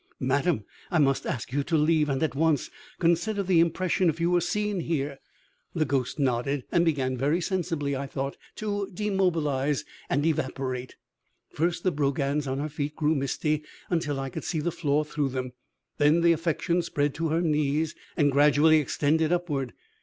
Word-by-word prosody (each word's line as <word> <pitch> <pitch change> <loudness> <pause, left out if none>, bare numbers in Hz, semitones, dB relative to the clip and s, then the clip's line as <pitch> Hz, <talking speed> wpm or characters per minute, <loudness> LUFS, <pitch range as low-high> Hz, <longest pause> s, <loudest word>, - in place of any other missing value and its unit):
"Madam, 140 - +1 0.3
I 175 - +1
must 135 -3 +2
ask 120 0 -3
you 145 - +2
to 165 - +1
leave, 150 0 +3
and 135 +3 0
at 150 -6 0
once. 155 -1 +1 0.3
Consider 185 +5 +1
the 180 -3 +3
impression 175 +2 +2
if 160 +1 -2
you 170 +1 +1
were 175 0 +3
seen 210 +3 -1
here 145 -4 -2 0.3
" - - -41
The 160 -2 +2
ghost 130 -1 -1
nodded, 135 0 0
and 170 - +3
began, 135 -6 +1
very 145 +7 +1
sensibly, 165 -6 -1
I 140 +1 -3
thought, 135 +1 -3 0.2
to 205 -2 -3
demobilize 165 -9 0 0.2
and 145 +2 +1
evaporate. 130 -4 -2 0.6
First 170 +2 -1
the 185 - +2
brogans 140 0 0
on 130 0 -2
her 150 +2 -2
feet 145 0 -4
grew 155 0 +2
misty 150 +2 0 0.3
until 150 -5 0
I 135 -1 -4
could - - -5
see 160 - -2
the 170 +3 -1
floor 150 -2 0
through 150 -2 -1
them, 130 -1 -4 0.5
then 150 +3 +4
the 170 0 +5
affection 170 +2 0
spread 145 -4 -1
to 165 +1 -1
her 165 +2 +1
knees 155 -1 +1 0.2
and 145 -3 +4
gradually 150 +3 +5
extended 155 +3 +1
upward. 150 -8 -1
150 Hz, 175 wpm, -27 LUFS, 140-170 Hz, 0.6 s, the